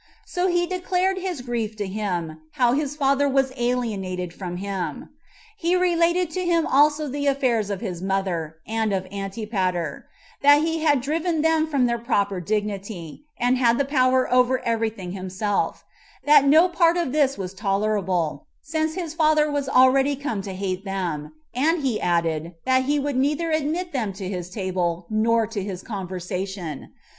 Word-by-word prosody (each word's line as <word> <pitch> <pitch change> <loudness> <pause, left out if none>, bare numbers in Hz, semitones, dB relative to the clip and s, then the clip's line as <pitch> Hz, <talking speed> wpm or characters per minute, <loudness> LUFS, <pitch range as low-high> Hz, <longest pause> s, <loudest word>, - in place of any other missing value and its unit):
So 360 +1 -1
he 350 -1 +2
declared 370 +1 0
his 365 -7 -4
grief 235 -3 -3
to 210 -1 -3
him, 180 -6 -3
how 245 -2 +3
his 290 +1 -1
father 280 0 +2
was 270 -1 +1
alienated 205 -8 -2
from 175 -1 -6
him. 195 -1 -4 0.5
He 355 -3 +1
related 350 -1 +2
to 370 +1 -2
him 340 -2 +2
also 295 +2 +3
the 285 +1 -2
affairs 250 -7 +1
of 200 0 -3
his 180 -6 -4
mother, 185 -5 -2
and 220 -1 0
of 190 -1 -1
Antipater; 195 -5 -3 0.3
that 290 +1 +6
he 325 0 0
had 290 -4 +3
driven 320 +3 -1
them 320 -1 +3
from 280 -5 +2
their 235 -1 0
proper 200 -5 0
dignity, 200 - -4
and 245 +1 +2
had 235 -2 +4
the 280 - +1
power 255 -2 +3
over 250 +1 +4
every 230 -1 +1
thing 190 -5 -8
himself; 190 +2 -2 0.4
that 290 -1 +6
no 315 +5 +6
part 340 -1 +3
of 340 -7 -1
this 280 -2 +2
was 190 -1 -5
tolerable, 195 -6 -1 0.2
since 315 +1 -1
his 340 -4 -4
father 310 -2 +3
was 285 -2 -1
already 270 +2 +4
come 265 -7 -3
to 195 -1 -6
hate 190 0 -3
them; 175 -7 -3 0.2
and 305 +5 +1
he 245 -5 0
added, 170 -1 0
that 260 0 +3
he 290 +2 +1
would 285 -2 -1
neither 300 +5 +1
admit 315 +3 -1
them 220 -7 -1
to 190 0 -6
his 180 -2 -4
table, 180 -3 -2
nor 225 +1 +2
to 215 -2 -4
his 190 -2 -5
conversation. 185 - -5
235 Hz, 170 wpm, -24 LUFS, 190-295 Hz, 0.5 s, that